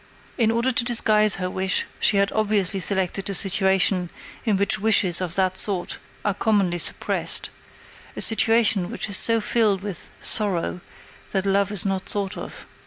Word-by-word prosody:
In 230 -4 +1
order 235 +3 0
to 235 - 0
disguise 215 -3 +3
her 185 - -4
wish 190 +1 -2
she 205 - +2
had 200 0 +1
obviously 205 -3 0
selected 190 +1 -2
a 200 - 0
situation 190 -2 +2 0.4
in 215 -4 +1
which 200 +2 +1
wishes 190 -4 +2
of 170 -2 -1
that 185 -1 0
sort 190 -4 -1 0.3
are 205 - +1
commonly 200 -4 0
suppressed - - -1 0.6
a - - -2
situation 225 -4 +2
which - - -2
is 190 - +1
so 230 -1 +4
filled 210 -3 +1
with 200 -5 -3
sorrow 185 -4 -1 0.5
that 195 -1 -1
love 200 +1 +1
is 205 -2 +2
not 190 -1 -3
thought 200 -1 -1
of. - - -9
200 Hz, 165 wpm, -22 LUFS, 185-215 Hz, 0.6 s, so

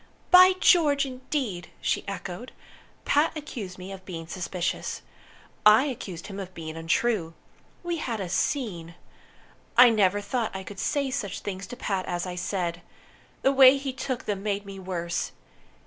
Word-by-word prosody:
"By 365 +1 +9
George, 295 -7 +5
indeed!" 255 - -4
she - - 0
echoed. 200 +3 -6 0.5
"Pat 305 +2 +2
accused 225 -11 -7
me 185 +1 -8
of 190 -1 -9
being 170 -3 -7
suspicious. 175 +1 -3 0.6
I 210 +4 +7
accused 195 - -5
him 200 -1 -7
of 185 -2 -7
being 160 -1 -6
untrue. 165 +1 0 0.5
We 345 -1 -2
had 240 -8 -3
a 190 - -3
scene! 175 - -2 0.8
I 245 -1 +9
never 205 -2 +3
thought 220 +1 -2
I 190 - -4
could 195 0 -9
say 280 -2 0
such 210 -8 -3
things 190 -1 -5
to 245 - -7
Pat 195 -6 -2
as 175 0 -2
I 180 - -4
said. 175 -1 -2 0.6
The 270 - +5
way 270 0 +8
he 270 -1 -4
took 255 -1 -4
them 200 -2 -2
made 205 -1 -2
me 195 -1 -8
worse. 170 -2 -3
200 Hz, 160 wpm, -26 LUFS, 180-260 Hz, 0.8 s, By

